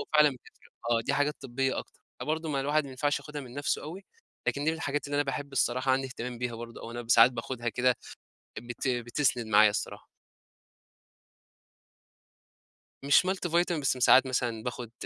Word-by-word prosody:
وفعلًا 150 -1 +4
بت 130 - -10 0.5
آه 115 -1 +3
دي - - +1
حاجات 145 +1 +1
طبية 135 0 -1
أكتر، - - -9 0.2
فبرضو 160 +1 -2
ما 140 -3 0
الواحد 145 +2 +1
ما 140 - -9
ينفعش 145 +3 0
ياخدها 150 -1 -7
من 125 -3 -11
نَفسه 145 0 -1
أوي، 180 +6 -8 0.4
لكن 140 - -1
دي 155 - +3
من 160 - -3
الحاجات 145 -2 -2
اللي 145 - -4
أنا 145 - +3
باحب 140 0 -4
الصراحة 130 0 +1
عندي 135 +1 +1
اهتمام 125 -2 -6
بيها 125 -1 -3
برضو 115 0 -8
أو - - -8
أنا 120 +1 -6
ساعات 115 +2 +7
باخدها 120 0 -4
كده 125 +2 +2 0.6
بت 120 +3 -5
بتسند 120 0 0
معايا 105 0 +6
الصراحة. 105 - -4 3.0
مش 145 +6 +5
multivitamin 175 -3 0
بس 135 -2 +1
ساعات 130 +2 +6
مثلًا 120 -3 -1
باخد 120 -1 -5
130 Hz, 170 wpm, -29 LUFS, 120-145 Hz, 3.0 s, ساعات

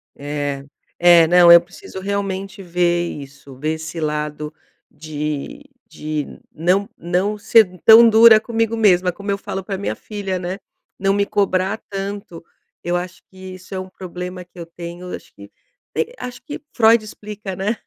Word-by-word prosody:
É, 145 -1 -4 0.4
é, 175 -2 +7
não, 175 0 +7
eu 170 0 +10
preciso 180 +2 -11
realmente 195 0 -4
ver 175 -1 0
isso, 140 -1 -11
ver 155 +4 -2
esse 160 +1 -6
lado 150 0 -3 0.4
de 150 - -5 0.3
de 150 -1 -4 0.3
não 185 +5 +1
não 185 +5 -1
ser 220 +2 +5 0.2
tão 230 +1 +9
dura 220 0 +7
comigo 225 0 -1
mesma, 185 -5 +3
como 200 +3 -5
eu 200 - 0
falo 195 -1 -5
pra 195 0 -4
minha 200 - -3
filha, 200 -3 -5
né, 180 +1 -4 0.4
não 195 0 +2
me 200 0 +1
cobrar 200 0 0
tanto. 195 -3 -6 0.4
Eu 175 0 -1
acho 180 0 -7
que 190 - -20 0.2
isso 185 +1 -13
é 190 - -3
um 185 0 -7
problema 180 0 -7
que 175 0 -17
eu 170 - -6
tenho, 170 +2 -9
acho - - -14
que 100 0 -14 0.5
eh, 485 - -1
acho 250 -1 -8
que 295 -2 -7 0.2
Freud 225 -1 +5
explica, 210 -2 -8
né. 205 +5 -2
185 Hz, 165 wpm, -20 LUFS, 170-200 Hz, 0.5 s, eu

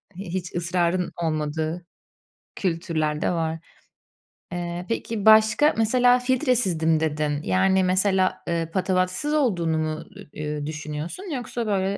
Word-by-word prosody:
hiç 185 -2 -5
ısrarın 175 +1 0
olmadığı 155 +2 -2 0.7
kültürler 165 -4 -1
de - - +2
var. 165 -2 -1 0.9
Eee, 175 0 -4
peki, 225 -2 -3
başka, 220 +7 +6
mesela, 245 +2 +4
filtresizdim 235 - +1
dedin, 150 -2 -1
yani, 190 0 +2
mesela, 185 0 +2
ııı, 165 -1 -1
patavatsız 185 - 0
olduğunu 175 - +1
mu, 155 0 -1
ı - - -9 0.4
uuu, 150 -1 -3
düşünüyorsun 155 - -5
yoksa, 240 -2 -4
böyle, 195 0 0
180 Hz, 115 wpm, -24 LUFS, 160-205 Hz, 0.9 s, başka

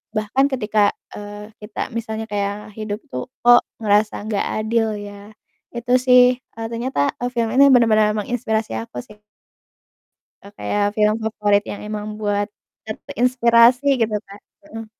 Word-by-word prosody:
Bahkan 215 +6 +1
ketika, 210 -3 +2 0.2
eee, 205 +1 -9
kita 210 0 -5
misalnya 220 -1 -4
kayak 205 +1 -3
hidup 210 -1 -4
itu, 295 - -6 0.2
kok 240 0 +7 0.2
ngerasa 210 -1 +1
nggak 210 -2 -1 0.2
adil 225 -1 0
ya, 205 0 -10 0.4
itu 240 +1 -2
sih, 250 0 +6
eee, 225 -3 -8
ternyata, 235 - -1
eee, 245 - -2
film 235 -2 0
ini 280 +1 +7
benar-benar 215 -3 +4
menginspirasi 220 - -2
aku 115 +2 -7
sih. 210 0 -17 1.2
Eee, 200 - -13
kayak 205 0 -1
film 210 0 +3
favorit 210 -2 +1
yang 205 - -7
emang 210 -1 -5
buat 205 -1 -1 0.4
ter 215 - -5
terinspirasi 240 +1 +4 0.2
gitu, 220 -1 +1
Kak. 200 +1 -13 0.3
Heeh. 225 -6 -8
215 Hz, 145 wpm, -20 LUFS, 205-235 Hz, 1.2 s, kok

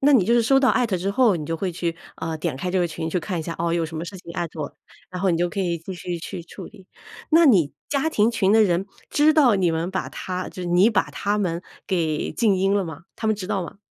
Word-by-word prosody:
那 285 +2 +5
你 230 -9 +5
就 235 +5 +3
是 235 - +4
收 270 +4 +4
到 265 - +4
艾 245 - +2
特 200 -5 -1
之 185 +3 -2
后 220 -2 +3
你 155 - -5
就 165 +1 -2
会 185 +1 -2
去， 170 -1 -3 0.2
呃， 160 -1 -3
点 155 -4 -2
开 180 +6 -3
这 185 - +1
个 175 - +2
群 160 -1 -4
去 180 - 0
看 180 0 -3
一 160 - -3
下， 165 - -5
哦， 170 0 0
有 170 -1 +1
什 160 0 -6
么 165 - -3
事 190 - -8
情 170 - -10
艾 170 - -1
特 160 - -9
我？ 145 - -3 0.4
然 180 0 -5
后 195 - +2
你 170 - +2
就 175 0 +1
可 185 - -7
以 170 -3 -1
继 175 +4 -8
续 175 -1 -5
去 170 - -7
处 170 - -10
理， 195 -4 -15 0.4
那 325 0 +6
你 180 - +4 0.2
家 290 +2 +1
庭 220 -5 +3
群 200 -3 +2
的 220 0 +6
人 185 0 +1 0.2
知 300 +1 +4
道 285 -8 +5
你 180 -3 +2
们 165 +3 -2
把 190 - -3
他 185 0 -5
就 185 - -8
是 175 - -3
你 180 +6 +5
把 205 - +1
他 205 +1 -1
们 175 -3 -1 0.2
给 165 -5 -1
静 220 -4 +2
音 195 +2 +2
了 200 -2 +1
吗？ 160 0 -8
他 220 - -3
们 220 - +3
知 195 -3 -6
道 200 -3 -1
吗？ 175 - -9
185 Hz, 315 characters per minute, -23 LUFS, 170-210 Hz, 0.4 s, 那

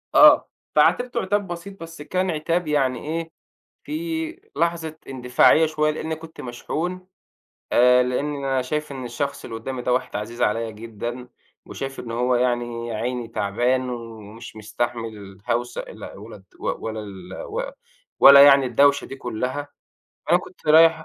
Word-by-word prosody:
آه، - - +7 0.3
فعاتبته 245 -1 +3
عتاب 205 +1 0
بسيط 175 +2 -8
بس 165 -2 -10
كان 185 +4 -1
عتاب 165 +2 -1
يعني 135 -4 +1
إيه 165 +1 -4 0.5
فيه 325 +1 -4 0.2
لحظة 165 -2 -1
إندفاعية 130 +4 +4
شوية 155 -1 +1
لإني 160 +1 -4
كنت 160 0 -11
مشحون، 175 +9 -4 0.6
آآ، 125 +1 +6
لإن 140 +4 -1
أنا 135 -2 -1
شايف 150 +4 -3
إن 130 -2 -6
الشخص 140 +4 -3
اللي 115 - -6
قدامي 125 +2 -5
ده 125 0 +1
واحد 125 - -2
عزيز 110 +4 -5
عليّا 115 +2 +1
جدًا، 115 +3 -7 0.4
وشايف 135 0 -6
إن 115 - -6
هو 125 +2 +1
يعني 120 -1 -1
يا 115 - -4
عيني 120 +2 -3
تَعبان 120 +5 0
ومش 115 -2 -9
مستحمل 110 -2 -5
هوسة 120 +1 -1
ال - - -12
ولا 105 -1 -11 0.2
ولا 110 -1 -3
ال 95 -3 -10
و 480 +4 -3 0.6
ولا 140 0 +10
يعني 140 -1 +7
الدوشة 140 +3 +3
دي 135 - -8
كلّها. 125 +3 -4 0.6
فأنا - - +5
كنت - - -14
رايح 160 0 +6
130 Hz, 150 wpm, -23 LUFS, 115-160 Hz, 0.6 s, ولا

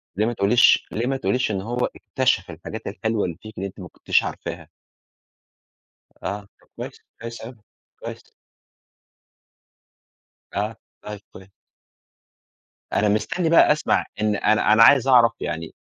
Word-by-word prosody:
ليه 105 +3 +1
ما 120 - -1
تقوليش 115 +3 +4
ليه 120 +3 -2
ما 135 0 0
تقوليش 130 -3 0
إن 95 -2 -2
هو 120 +4 -2
اكتشف 130 -9 0
الحاجات 85 +7 -8
الحلوة 110 +1 -1
اللي 85 -3 -5
فيكِ، 110 0 -11
اللي 100 +1 -3
أنتِ 95 - -13
ما 90 - -8
كنتيش - - +1
عارفاها؟ - - -6 1.5
آه، 100 +4 -3 0.2
طب - - -28
كويس. - - -8 0.2
كويس 115 0 -7
أوي، 120 +3 -9 0.4
كويس. - - -9 2.2
آه، 105 +2 -2 0.3
طيب 105 -1 -8
كويس. 95 +1 -13 1.4
أنا 105 0 +2
مستني 160 - 0
بقى 165 -2 +6
اسمع 150 - +1 0.2
إن 105 -1 +1
أنا 105 +1 +3
أنا 115 - +7
عايز 135 +1 +6
أعرف 120 -3 +6
يعني 80 +1 -5
110 Hz, 140 wpm, -23 LUFS, 100-120 Hz, 2.2 s, أنا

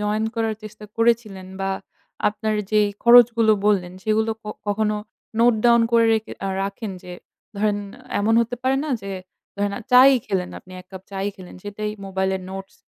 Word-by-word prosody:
Join 210 +1 0
করার 225 -1 -1
চেষ্টা 215 0 -10
করেছিলেন? 230 -5 +1
বা 195 0 -1 0.6
আপনার 215 +1 -2 0.2
যেই 210 -1 +3
খরচগুলো 235 -2 +6
বললেন 185 -4 +2
সেগুলো 220 +1 +1
ক - - -58 0.2
কখনো 210 +1 0 0.4
নোট 235 +1 +5
ডাউন 235 -1 +6
করে 230 -1 +5
রেখে 220 0 -3
আ - - -1
রাখেন? 200 +2 -4
যে 180 -1 -9 0.4
ধরেন 205 0 +1 0.4
এমন 220 +2 +2
হতে 235 +1 -2
পারে 265 +1 +2
না 310 - -4
যে 200 - -6 0.5
ধরেন 205 0 -1 0.2
চা-ই 265 +2 +8
খেলেন, 190 -3 -2
আপনি 185 - -16
এক 180 - -18
কাপ 190 - -8
চা-ই 195 0 -2
খেলেন। 185 -2 -12
সেটাই 210 +1 -4 0.2
মোবাইলের 190 0 -1
নোটস 195 +1 -8
215 Hz, 165 wpm, -22 LUFS, 195-230 Hz, 0.6 s, চা-ই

